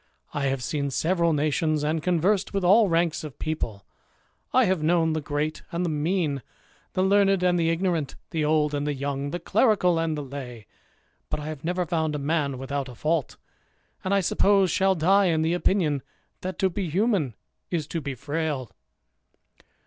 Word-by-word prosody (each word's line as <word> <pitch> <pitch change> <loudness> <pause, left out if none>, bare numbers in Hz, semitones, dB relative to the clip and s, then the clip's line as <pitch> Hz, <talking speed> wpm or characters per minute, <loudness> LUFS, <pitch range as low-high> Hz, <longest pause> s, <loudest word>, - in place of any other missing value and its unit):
I 145 -1 -1
have 135 -2 -1
seen 140 +1 -1
several 170 +4 +1
nations, 155 0 +1
and 155 +1 0
conversed 180 +4 +1
with 195 - 0
all 200 +3 +5
ranks 165 -1 +1
of 150 -4 -8
people; 115 - -4 0.7
I 255 -1 +4
have 185 -4 +1
known 160 0 +2
the 155 - -1
great 150 +1 -2
and 170 +1 -1
the 170 - -1
mean, 155 -2 0 0.5
the 185 - +1
learned 195 -1 +3
and 180 -1 +3
the 165 -1 +2
ignorant, 165 -4 -1 0.2
the 160 -2 0
old 150 -1 +2
and 145 0 -1
the 145 - -1
young, 140 +1 -3
the 175 - -3
clerical 195 -6 +3
and 165 -2 -1
the 145 - -3
lay; 125 -5 -8 0.6
but - - -2
I 150 - -6
have 155 -3 -7
never 180 +2 -1
found 160 -2 -1
a - - 0
man 145 -2 -1
without 135 +1 -3
a 125 - -10
fault; 155 +2 -1 0.7
and 185 - -2
I 200 0 +3
suppose 195 0 +3
shall 190 +2 +3
die 195 +5 +4
in 160 -3 +2
the 165 +1 +1
opinion, 175 -6 +1 0.4
that 185 -1 -4
to 190 -1 +1
be 185 -1 -3
human 185 - +1 0.3
is 165 -4 -1
to 165 - -3
be 140 -2 -4
frail." 145 -3 -3
160 Hz, 185 wpm, -25 LUFS, 145-180 Hz, 0.7 s, all